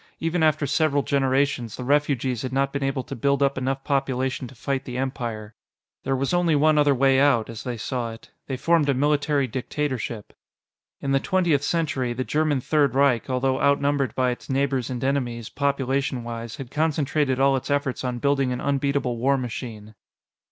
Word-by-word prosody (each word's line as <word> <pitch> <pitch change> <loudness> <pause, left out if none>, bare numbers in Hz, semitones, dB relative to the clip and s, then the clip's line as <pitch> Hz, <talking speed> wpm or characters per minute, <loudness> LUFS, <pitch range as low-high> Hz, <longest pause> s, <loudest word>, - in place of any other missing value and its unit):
Even 165 +1 -1
after 155 -2 +3
several 145 0 +1
generations, 135 -4 0
the 125 - -6
refugees 135 -3 +1
had 130 - -4
not 135 +1 0
been 140 - -2
able 135 -1 -1
to - - -7
build 140 +3 +1
up 140 0 +2
enough 135 +1 -2
population 130 -2 -1
to 130 - -14
fight 135 +2 -2
the 125 -1 -6
Empire. 115 -5 -4 0.5
There 135 0 -1
was 135 +5 -1
only 175 -3 +3
one 150 +1 +4
other 145 -1 +4
way 135 +1 +4
out, 135 -6 +3
as 115 - -8
they 125 -2 -4
saw 120 +1 -3
it. 115 - -15 0.2
They 130 - -3
formed 155 +1 +2
a 140 - +3
military 145 0 +2
dictatorship. 125 -3 -4 0.7
In 135 - -2
the 135 - +3
Twentieth 175 -5 +1
Century, 140 -7 -1
the 130 +2 -2
German 150 -1 0
Third 145 -2 +2
Reich, 135 -3 +2
although 130 +1 0
outnumbered 140 -3 +2
by 130 -1 +2
its 120 - -8
neighbors 135 -2 0
and 125 -1 -4
enemies, 120 -4 -1
populationwise, 130 -4 -2
had 135 -2 -8
concentrated 150 -3 0
all 135 0 +4
its 130 +2 -4
efforts 140 -2 -1
on 125 -1 -2
building 135 0 +1
an 125 - -2
unbeatable 140 -3 0
war 135 +4 +2
machine. 110 -4 -6
135 Hz, 180 wpm, -24 LUFS, 125-140 Hz, 0.7 s, one